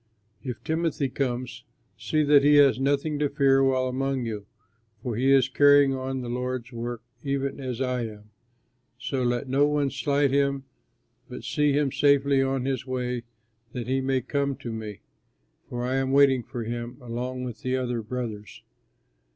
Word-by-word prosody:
If 125 -3 -6
Timothy 160 -4 -1
comes, 125 -2 -3 0.3
see 155 -1 0
that 145 -1 +5
he 145 +1 +6
has 140 -3 +6
nothing 145 +2 0
to 145 -1 +1
fear 135 -1 +3
while 130 -1 +2
among 130 0 -1
you, 105 -3 -5 0.6
for 120 -4 -2
he 130 +4 +2
is 135 -2 +5
carrying 145 0 +5
on 130 0 -3
the 125 - -6
Lord's 125 0 -3
work 120 0 -5 0.2
even 140 0 -2
as 130 -3 -4
I 125 -3 -1
am. 105 -1 -13 0.7
So 130 +1 -3
let 120 +1 0
no 140 +3 +3
one 145 -2 0
slight 140 +1 +1
him, 140 -1 +1 0.7
but 125 - -8
see 150 -1 +1
him 145 -1 +1
safely 140 -1 +3
on 135 -1 0
his 135 -1 -2
way 125 -2 -3 0.5
that 125 -2 -4
he 130 +2 0
may 130 0 0
come 140 +2 -1
to 120 - -7
me, 110 -2 -7 0.7
for 120 0 -4
I 130 +1 0
am 135 0 0
waiting 135 -2 +5
for 120 0 -6
him 120 +1 -5
along 125 +1 -4
with 125 -2 -6
the 130 0 -1
other 125 -2 -2
brothers. 110 -2 -6
130 Hz, 170 wpm, -26 LUFS, 125-140 Hz, 0.7 s, he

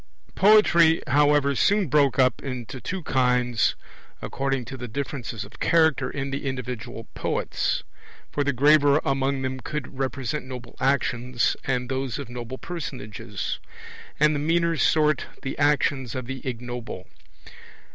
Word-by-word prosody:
Poetry, 175 -5 +6
however, 145 0 +3
soon 205 +8 +3
broke 140 -3 +3
up 130 -3 +3
into 130 -1 -6
two 185 -1 -4
kinds 125 -4 +2 0.4
according 135 -2 -2
to 135 - -7
the 125 -1 -6
differences 120 -4 -4
of 110 +2 -15
character 160 -4 +3
in 140 -1 -4
the 140 0 -3
individual 125 -2 -5
poets; - - -1 0.5
for 145 - 0
the 140 - +1
graver 145 +2 +5
among 135 0 0
them 130 0 -3
would 140 -3 -5
represent 135 +1 -2
noble 125 -2 -8
actions, 125 -2 +1
and 125 -2 -1
those 130 -1 -2
of 140 -4 -7
noble 120 +1 -6
personages; 110 - -5 0.6
and 150 +1 +5
the 145 - -1
meaner 165 +2 +2
sort 155 -1 +2 0.2
the 135 - -3
actions 140 -3 +1
of 130 -1 -4
the 135 +1 -6
ignoble. 120 -5 -5
135 Hz, 135 wpm, -25 LUFS, 125-145 Hz, 0.6 s, Poetry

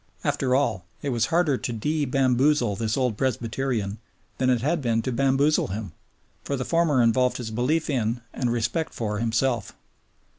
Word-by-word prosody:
After 130 -1 +1
all, 130 -10 +1 0.2
it 145 - -1
was 120 -3 +1
harder 165 -6 +2
to - - -3
de 150 +7 -1
bamboozle 130 -3 +2
this 110 +3 -1
old 125 -4 +1
Presbyterian 115 -4 -1 0.4
than 130 0 +2
it 125 -3 +2
had 160 +3 +1
been 115 -3 0
to 130 - -2
bamboozle 135 +4 +2
him; 100 -1 -5 0.5
for 140 - -2
the 130 -1 -3
former 165 -7 +3
involved 125 +2 +2
his 115 -3 -5
belief 130 +8 0
in 120 -4 -1
and 125 -2 -1
respect 120 +7 -1
for 105 -2 -2
himself. 115 0 0
125 Hz, 170 wpm, -25 LUFS, 115-140 Hz, 0.5 s, former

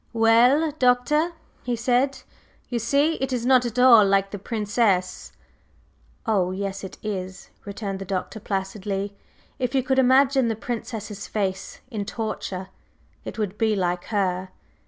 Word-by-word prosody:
"Well, 240 +7 +4
Doctor," 255 +7 +2 0.3
he 245 -1 -2
said, 250 +4 0 0.5
"you 240 - -1
see 285 +8 +2
it 265 0 -1
is 245 -2 -1
not 255 -1 +4
at 235 +1 -7
all 250 -4 +8
like 195 0 +2
the 205 - -5
Princess." 205 -3 0 0.9
"Oh, 200 -6 +1
yes 195 +1 -4
it 190 - -8
is!" 190 -3 -5
returned 200 -1 -5
the 195 - -6
Doctor 190 +3 -4
placidly. 195 0 -3 0.4
"If 250 0 -1
you 260 - +2
could 265 +1 +1
imagine 265 0 +4
the 225 - 0
Princess's 220 -3 -5
face 195 -2 -3
in 210 -3 -3
torture, 195 -4 -4 0.6
it - - -7
would 210 -2 -3
be 220 -2 +2
like 180 -2 -1
her. 190 -3 -1
220 Hz, 145 wpm, -24 LUFS, 195-250 Hz, 0.9 s, all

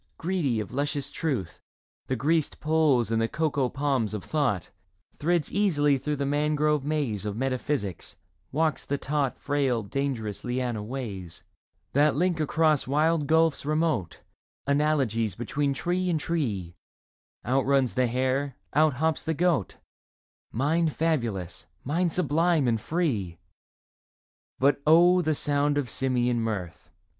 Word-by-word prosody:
Greedy 165 -10 0
of 105 - -5
luscious 145 +1 -2
truth, 125 - -3 0.5
the 130 - 0
greased 155 +5 0
Poles 150 -7 +2
and 115 0 +2
the 115 - +2
coco 145 -2 0
palms 135 -7 -1
of 105 - -5
thought, 135 - -1 0.5
Thrids 170 +1 +1
easily 145 -9 +2
through 150 +3 -2
the 140 0 -2
mangrove 150 0 +1
maze 140 -9 -1
Of 105 0 -4
metaphysics, 130 - -2 0.4
walks 155 +2 0
the 140 - -2
taut 140 -2 -1
Frail 135 -5 0
dangerous 115 -3 -3
liana 120 -3 -2
ways 105 -7 -6 0.5
That 150 +2 +4
link 175 +1 +1
across 155 -2 +2
wide 150 +2 +2
gulfs 160 -1 +3
remote 155 - -1 0.4
Analogies 140 - +1
between 140 +5 -1
tree 180 +6 -1
and 165 -3 +1
tree; 110 - -2 0.7
Outruns 135 0 +2
the 125 -1 +2
hare, 130 +2 -1 0.2
outhops 155 +1 +2
the 160 0 -1
goat; 170 - +1 0.7
Mind 155 +6 +1
fabulous, 115 - -1 0.2
mind 170 +5 0
sublime 165 -3 +2
and 115 -2 +1
free! 115 - -1 1.2
But 140 +1 +2
oh, 175 +3 +6
the 155 -2 0
sound 145 0 +1
of 140 -4 -2
simian 125 -2 +1
mirth 100 -7 -4
140 Hz, 130 wpm, -27 LUFS, 120-155 Hz, 1.2 s, oh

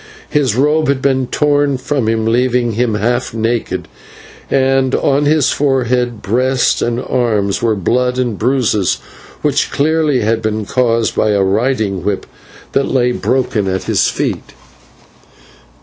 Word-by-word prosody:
His 135 -7 +1
robe 150 +4 +2
had 140 -1 +1
been 130 -1 0
torn 145 -1 +1
from 130 -2 -2
him, 110 -1 0
leaving 120 +1 +1
him 115 0 0
half 120 +3 -1
naked, 110 -6 -2 0.6
and 135 -1 +2
on 140 +1 +1
his 150 -1 +3
forehead, 125 -4 0
breast, 125 +4 +1
and 120 0 -1
arms 110 -7 0
were 115 -2 +1
blood 125 +6 0
and 125 -4 -1
bruises 110 -4 +1 0.5
which - - +1
clearly 150 -2 +1
had 115 +1 0
been 110 -1 -2
caused 115 -1 0
by 110 - +1
a 100 -1 +2
riding 105 -2 0
whip 100 0 -2 0.5
that 135 - +1
lay 125 -2 +2
broken 125 -5 -1
at 95 0 -2
his - - +1
feet. - - -3
125 Hz, 140 wpm, -15 LUFS, 110-135 Hz, 0.6 s, his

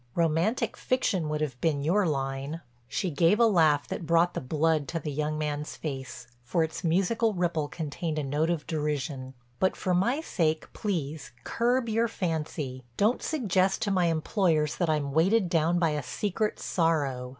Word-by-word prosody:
Romantic 170 +7 +1
fiction 190 -11 0
would 150 0 -2
have 130 -5 -3
been 150 -4 +1
your 185 +5 +2
line." 135 +2 -2 0.3
She 180 +7 -2
gave 165 +8 +3
a 235 - +6
laugh 160 -9 +3
that 165 - -5
brought 170 +1 +3
the - - -3
blood 155 +2 +1
to 165 0 -2
the 150 -1 -4
young 150 +2 -1
man's 150 0 -3
face, 130 -4 -6 0.2
for 145 +7 +1
its 160 +3 -4
musical 195 +6 +2
ripple 170 -4 0
contained 155 +1 -4
a 150 - 0
note 145 +4 0
of 170 -3 -1
derision: 145 -4 -3 0.2
"But 190 - +2
for 185 - -1
my 235 - +2
sake 160 - -1
please 160 - -3
curb 240 +1 +1
your 225 +1 +2
fancy. 155 - -3
Don't 215 +5 +2
suggest 195 - +1
to 205 - 0
my 180 -3 +3
employers 160 -2 +1
that 175 -3 0
I'm 150 -3 0
weighted 185 +6 +3
down 170 +1 +2
by 165 -2 +2
a 150 0 -1
secret 210 - -2
sorrow. 145 -7 0
160 Hz, 170 wpm, -28 LUFS, 150-185 Hz, 0.3 s, a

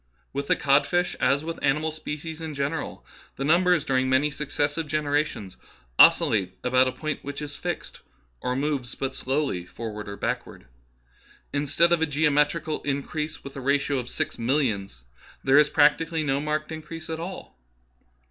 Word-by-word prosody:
With 140 +1 -3
the - - +4
codfish, 145 +6 +2
as 140 +2 +2
with 165 +1 -5
animal 150 +3 +1
species 155 +1 -6
in 160 -2 -5
general, 140 - -3 0.3
the 135 - -3
numbers 175 0 +4
during 130 -2 +1
many 135 +3 +3
successive 145 +2 -2
gen 155 +1 0
erations 145 -10 -1 0.4
oscillate 95 -4 +5
about 125 +1 +4
a - - 0
point 155 +4 -4
which 140 0 -5
is 150 -1 -6
fixed, - - -5 0.4
or 125 - -1
moves 135 -3 -2
but 135 -1 -3
slowly 135 -9 -1
forward 105 +2 -7
or 100 - -6
backward. - - -4 0.9
Instead 150 +4 +3
of 170 - +2
a 160 - +2
geometrical 150 +2 +1
increase 150 +2 -3
with 140 - -9
a 135 - -5
ratio 140 +1 +1
of 125 0 -6
six - - -3
mill 125 +5 +2
ions, 100 - -3 0.4
there 135 +2 +6
is 150 0 +5
practically 160 +2 +3
no 140 -2 +1
marked 150 +1 -2
increase 160 +1 -7
at 160 0 -4
all. 180 +3 -7
145 Hz, 165 wpm, -26 LUFS, 130-155 Hz, 0.9 s, there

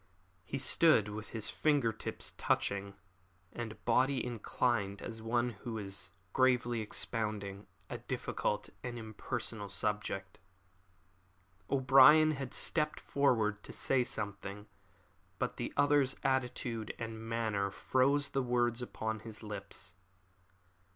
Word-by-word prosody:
He 135 - -4
stood 135 -5 +4
with 110 +1 -6
his 110 -3 -2
finger 145 -7 +2
tips - - -4
touching, 100 0 0 0.6
and 120 -2 -4
his - - -21
body 130 +2 +2
inclined 115 -3 0
as 115 -1 -6
one 120 +2 +1
who 115 -2 -4
is 95 -3 -3 0.2
gravely 125 -3 +3
expounding 105 -2 -2 0.2
a - - -5
difficult - - -2
and 120 -1 -5
impersonal 110 -1 -4
subject. 100 -1 -2 1.3
O'Brien 140 +4 +7
had 135 -3 -4
stepped 150 -2 +1
forward 110 -7 +1
to - - -10
say 130 -2 +2
something, 100 -2 -4 0.7
but - - -2
the - - -3
other's 145 -2 +4
attitude 125 -4 -1
and 115 -1 -6
manner 110 -4 0
froze 140 +7 +2
the 135 - 0
words 120 -1 +1
upon 110 -2 -3
his 110 0 -9
lips. 105 -4 -7
115 Hz, 115 wpm, -33 LUFS, 105-130 Hz, 1.3 s, O'Brien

